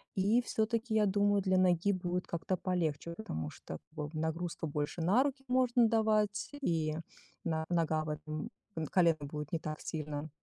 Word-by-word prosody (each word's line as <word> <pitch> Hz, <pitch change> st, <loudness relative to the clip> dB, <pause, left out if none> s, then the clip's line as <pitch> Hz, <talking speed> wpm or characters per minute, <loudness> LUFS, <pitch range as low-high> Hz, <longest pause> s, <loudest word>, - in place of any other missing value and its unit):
И 205 Hz, +6 st, +4 dB
всё-таки 225 Hz, 0 st, 0 dB
я 215 Hz, -1 st, +5 dB
думаю, 205 Hz, 0 st, +3 dB
для 190 Hz, -1 st, +3 dB
ноги 185 Hz, +1 st, +4 dB
будет 180 Hz, -1 st, -2 dB
как-то 170 Hz, +3 st, -1 dB
полегче, 170 Hz, -3 st, -1 dB
потому 80 Hz, -, -4 dB
что 80 Hz, -, -8 dB
вот 150 Hz, -1 st, -5 dB
нагрузка 165 Hz, +2 st, -2 dB
больше 150 Hz, +3 st, -2 dB
на 200 Hz, +10 st, +4 dB
руки 275 Hz, -1 st, -3 dB
можно 250 Hz, -2 st, +4 dB
давать 215 Hz, -2 st, +2 dB
и 160 Hz, -, +1 dB, 0.5 s
на 160 Hz, -2 st, 0 dB
нога 160 Hz, -3 st, +2 dB
в -, -, -4 dB
этом 155 Hz, +5 st, -4 dB, 0.4 s
колено 170 Hz, -3 st, +5 dB
будет 150 Hz, +1 st, -5 dB
не 165 Hz, -, +1 dB
так 155 Hz, -1 st, -5 dB
сильно 150 Hz, -1 st, -4 dB
175 Hz, 160 wpm, -33 LUFS, 155-210 Hz, 0.5 s, я